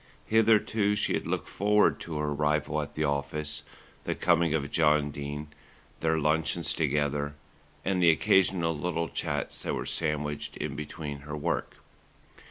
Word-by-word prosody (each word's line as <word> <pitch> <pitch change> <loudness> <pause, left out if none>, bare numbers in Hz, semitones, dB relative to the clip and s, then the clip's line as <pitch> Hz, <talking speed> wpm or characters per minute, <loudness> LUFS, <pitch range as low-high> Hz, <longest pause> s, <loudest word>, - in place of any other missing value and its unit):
Hitherto 110 -1 +3
she 105 - +1
had - - -2
looked - - -2
forward 105 +1 +3
to 80 -2 -5
her 75 0 -1
arrival 75 +1 0
at 75 - -7
the 75 - 0
office, 75 +1 -2 0.4
the - - -1
coming 85 -2 +3
of 70 -2 -2
John 75 -2 +3
Dene, 70 +1 -6 0.5
their 80 0 +1
luncheons 80 +2 +2
together 75 -1 0 0.5
and 95 -1 +1
the 85 - +6
occasional 85 +1 +3
little 85 +2 -2
chats - - -3
that - - -2
were - - -3
sandwiched 75 -2 -2
in 75 -3 -4
between 75 0 -6
her 75 +2 -6
work. 75 - -2
75 Hz, 150 wpm, -29 LUFS, 75-85 Hz, 0.5 s, the